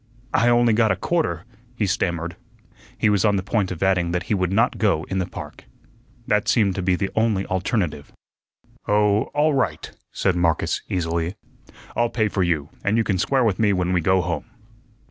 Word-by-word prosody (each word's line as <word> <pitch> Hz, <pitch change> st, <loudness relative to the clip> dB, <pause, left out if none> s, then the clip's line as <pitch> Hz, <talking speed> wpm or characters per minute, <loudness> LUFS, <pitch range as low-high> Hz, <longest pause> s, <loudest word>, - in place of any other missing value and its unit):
"I 120 Hz, +1 st, +3 dB
only 120 Hz, -1 st, +4 dB
got 110 Hz, 0 st, +3 dB
a -, -, +2 dB
quarter," 100 Hz, -, -1 dB, 0.3 s
he 110 Hz, -, 0 dB
stammered. 85 Hz, -3 st, -1 dB, 0.6 s
He -, -, +2 dB
was 105 Hz, -3 st, +2 dB
on 105 Hz, -2 st, +3 dB
the 95 Hz, -, -1 dB
point 100 Hz, -1 st, 0 dB
of 90 Hz, 0 st, -4 dB
adding 90 Hz, -3 st, +1 dB
that 90 Hz, -1 st, -1 dB
he 105 Hz, -, -2 dB
would 95 Hz, -2 st, 0 dB
not 115 Hz, +2 st, +1 dB
go 100 Hz, -7 st, +2 dB
in 95 Hz, -, 0 dB
the 90 Hz, -, -1 dB
park. -, -, -9 dB, 0.6 s
That 105 Hz, -2 st, +1 dB
seemed 105 Hz, -5 st, +3 dB
to 95 Hz, -, -3 dB
be 90 Hz, 0 st, +2 dB
the 95 Hz, +2 st, -2 dB
only 110 Hz, -3 st, +1 dB
alternative. 95 Hz, -5 st, -2 dB, 0.8 s
"Oh, 105 Hz, 0 st, +3 dB
all 150 Hz, +1 st, +3 dB
right!" 135 Hz, -2 st, -1 dB, 0.2 s
said 95 Hz, -, 0 dB
Marcus, 85 Hz, -3 st, 0 dB
easily. 85 Hz, 0 st, -1 dB, 0.6 s
"I'll 120 Hz, 0 st, +1 dB
pay 110 Hz, -3 st, 0 dB
for 95 Hz, -, -1 dB
you, 80 Hz, -5 st, 0 dB
and 100 Hz, +3 st, +1 dB
you 115 Hz, -, +3 dB
can 95 Hz, -4 st, -1 dB
square 135 Hz, +5 st, +2 dB
with 105 Hz, -5 st, +1 dB
me 105 Hz, -2 st, +3 dB
when 90 Hz, -1 st, 0 dB
we 90 Hz, -, +2 dB
go 95 Hz, +2 st, +3 dB
home." 85 Hz, -3 st, -3 dB
95 Hz, 195 wpm, -22 LUFS, 90-110 Hz, 0.8 s, only